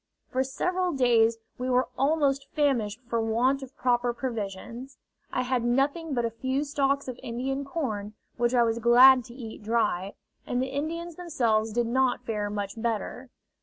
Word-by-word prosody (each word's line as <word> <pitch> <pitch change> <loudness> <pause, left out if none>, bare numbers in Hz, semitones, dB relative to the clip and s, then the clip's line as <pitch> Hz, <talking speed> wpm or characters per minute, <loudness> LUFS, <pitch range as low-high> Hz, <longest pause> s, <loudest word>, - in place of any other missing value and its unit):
For 260 +1 +1
several 360 +7 -1
days 230 -4 +3 0.2
we 255 +1 -2
were 255 0 +3
almost 275 0 +1
famished 245 -7 +1
for 230 -1 0
want 245 +5 +1
of 265 0 -11
proper 245 -1 +1
provisions: 235 +2 -5 0.3
I 255 - 0
had 250 -1 0
nothing 275 +5 0
but 240 -1 +1
a 230 - -1
few 260 +5 -1
stalks 280 -1 0
of 255 -1 -6
Indian 265 +4 -3
corn, 220 -8 -4 0.2
which 240 +1 +1
I 240 - +5
was 230 0 0
glad 250 +2 +7
to 235 - -12
eat 230 -4 -8
dry, 210 -4 0 0.3
and 245 - -1
the 260 +1 -1
Indians 330 +4 -4
themselves 235 -11 0
did 240 +2 +1
not 250 +1 +1
fare 210 -3 -2
much 205 +1 -4
better. 235 +3 -3
250 Hz, 165 wpm, -27 LUFS, 230-275 Hz, 0.3 s, glad